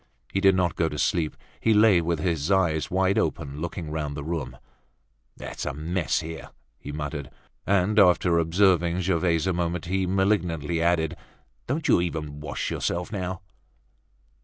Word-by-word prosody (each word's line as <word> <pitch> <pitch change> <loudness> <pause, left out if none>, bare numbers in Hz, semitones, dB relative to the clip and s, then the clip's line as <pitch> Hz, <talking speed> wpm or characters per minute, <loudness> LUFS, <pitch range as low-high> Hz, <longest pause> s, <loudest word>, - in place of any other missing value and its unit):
He 95 - +1
did 95 -1 +5
not 90 -3 +1
go 80 -1 +1
to 75 - -6
sleep, 80 +3 0 0.2
he 110 -1 +3
lay 105 -4 +6
with 85 0 -1
his 80 -1 -1
eyes 85 -5 +2
wide 95 +1 +2
open, 70 +2 -2
looking 85 -2 -5
round 75 -2 -3
the 75 - -4
room. 70 -6 -4 0.8
"It's - - -6
a - - -3
mess 85 +3 -1
here!" 80 0 -7 0.3
he 70 - -7
muttered. 75 -1 -5 0.4
And 100 +2 +3
after 90 -3 +4
observing 85 0 +2
Gervaise 85 -2 +1
a 95 - +1
moment, 85 -1 -2
he 95 +1 0
malignantly 90 -5 0
added: 85 -1 +1 0.5
"Don't 155 +1 -1
you - - +4
even 75 -4 -4
wash 75 - -4
yourself 90 +1 -2
now?" 95 -2 -4
85 Hz, 160 wpm, -25 LUFS, 80-95 Hz, 0.8 s, lay